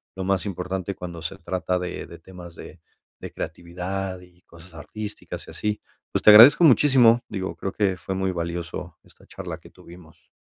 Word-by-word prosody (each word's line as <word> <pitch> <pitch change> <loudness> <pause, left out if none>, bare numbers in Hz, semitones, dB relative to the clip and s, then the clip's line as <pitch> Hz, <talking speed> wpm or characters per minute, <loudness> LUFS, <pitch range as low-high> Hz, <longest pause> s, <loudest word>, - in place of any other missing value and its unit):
lo 95 - -4
más 95 0 0
importante 95 0 -4
cuando 85 -2 -8
se 85 +4 -5
trata 90 -1 -2
de 90 0 -5
de 85 - -11
temas 85 -1 -12
de - - -12 0.4
de - - -8
creatividad 90 +2 -5
y 90 0 -20
cosas 85 +1 -17
artísticas 105 +7 -8
y - - -10
así. 105 0 -3 0.3
Pues, - - -1
te 105 - +9
agradezco 115 +11 +9
muchísimo, 125 -5 +5
digo, 95 -1 -4
creo 95 - -4
que 100 -3 0
fue 95 +2 -5
muy 95 0 -1
valioso 85 0 -5
esta - - -22
charla - - -8
que - - -16
tuvimos. 85 -2 -17
95 Hz, 180 wpm, -24 LUFS, 85-100 Hz, 0.4 s, te